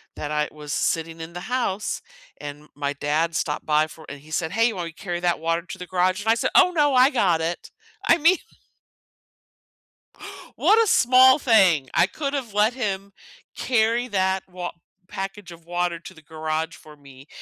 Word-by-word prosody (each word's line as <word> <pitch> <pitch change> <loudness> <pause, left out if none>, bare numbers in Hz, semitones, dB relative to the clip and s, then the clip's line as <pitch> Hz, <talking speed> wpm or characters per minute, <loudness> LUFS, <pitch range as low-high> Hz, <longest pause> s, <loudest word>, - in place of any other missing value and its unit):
that 150 - -5
I 150 0 0
was 150 -1 -7
sitting 165 0 -1
in 160 +1 -8
the 175 - -6
house, 220 -2 -2 0.4
and 145 +1 -8
my 145 0 -2
dad 155 +3 -1
stopped 150 0 -2
by 155 0 +2
for 160 0 -14
and 145 -1 -9
he 155 +2 -17
said, 160 +1 -2
"Hey, 225 +3 +3
you 225 - -6
want 175 -2 -4
me 165 - -10
to 160 - -15
carry 175 -2 -3
that 175 -1 +1
water 165 +1 -1
to 180 - -9
the 180 - -8
garage?" 185 +2 +1
And 220 - -2
I 225 - +5
said, 230 - -1
"Oh, 360 - +6
no. 295 -5 +2
I 255 +1 +6
got 180 - +2
it." 170 +1 -4 0.4
I 335 - +6
mean 335 +3 +4 2.2
what 445 +2 +5
a - - -2
small 260 -4 +6
thing. 190 - +4
I 175 - +4
could've 275 +2 -4
let 210 +3 +2
him 200 -5 -4 0.4
carry 235 0 +1
that 190 -3 0
wa 180 -1 -6 0.4
package 195 -2 -6
of 165 -1 -14
water 175 -1 -1
to 165 - -12
the 160 - -16
garage 155 +1 -3
for 155 -1 -15
me, 140 -1 -16
180 Hz, 195 wpm, -23 LUFS, 160-225 Hz, 2.2 s, Oh